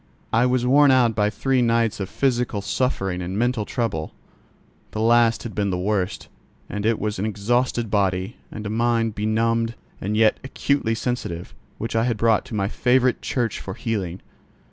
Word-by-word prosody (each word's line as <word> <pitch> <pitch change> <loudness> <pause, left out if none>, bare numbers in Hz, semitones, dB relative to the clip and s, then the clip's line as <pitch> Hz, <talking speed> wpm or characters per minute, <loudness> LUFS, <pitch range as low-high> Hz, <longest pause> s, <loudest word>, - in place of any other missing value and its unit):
I 115 +3 +4
was 125 -1 +1
worn 140 +3 +6
out 125 -3 +4
by 105 -1 +2
three 130 +4 +1
nights 115 -2 +1
of 95 -1 -3
physical 120 -6 0
suffering 100 -4 -1
and 90 +2 -4
mental 120 -1 0
trouble: 100 -12 -3 0.8
the 110 - -3
last 115 0 +4
had 115 - -6
been 100 -2 0
the 90 - -1
worst, 95 0 -1 0.4
and 105 +1 -2
it 115 -1 +2
was 105 -2 -3
an 105 - 0
exhausted 115 +2 0
body, 95 0 0
and 105 -1 -7
a 100 - -3
mind 115 0 +1
benumbed 115 +2 0 0.3
and 105 +3 -1
yet 110 -1 +4
acutely 135 -3 0
sensitive, 110 -8 -4 0.2
which 115 +1 -4
I 115 +1 +2
had 120 -3 0
brought 110 -1 +2
to 110 - -7
my 100 -1 0
favourite 125 +3 +2
church 120 -5 -1
for 95 - -7
healing. 95 -6 -3
115 Hz, 175 wpm, -23 LUFS, 105-120 Hz, 0.8 s, worn